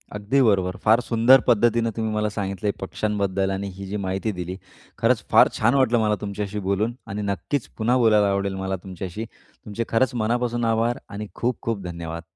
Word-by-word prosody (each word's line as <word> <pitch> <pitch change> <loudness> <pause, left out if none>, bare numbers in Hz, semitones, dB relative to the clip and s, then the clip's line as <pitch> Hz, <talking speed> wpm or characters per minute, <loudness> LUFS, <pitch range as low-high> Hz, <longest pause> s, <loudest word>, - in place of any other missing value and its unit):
अगदी 105 +7 +1
बरोबर. 95 -6 +2
फार 110 +2 +5
सुंदर 120 +2 +5
पद्धतीने 115 0 +3
तुम्ही 110 -1 -2
मला 105 0 0
सांगितलंय 100 -1 -2
पक्षांबद्दल 100 -1 -1
आणि 95 +1 -3
ही 100 - -7
जी 100 +2 -4
माहिती 95 +4 -1
दिली. 90 0 -5 0.4
खरंच - - +2
फार - - +7
छान 120 +4 +3
वाटलं 120 -4 +3
मला 105 -1 +2
तुमच्याशी 105 0 -4
बोलून 105 +4 0
आणि 105 +2 -4
नक्कीच 100 +7 -2
पुन्हा 120 +3 +2
बोलायला 110 -4 +4
आवडेल 100 0 -1
मला 95 0 -2
तुमच्याशी. 95 +3 -6 0.4
तुमचे 105 +2 -3
खरंच 115 +2 +2
मनापासून 120 +1 0
आभार 115 +1 +1
आणि 105 +1 -6
खूप-खूप 115 -3 -2
धन्यवाद. 85 -1 -6
105 Hz, 170 wpm, -23 LUFS, 100-115 Hz, 0.4 s, फार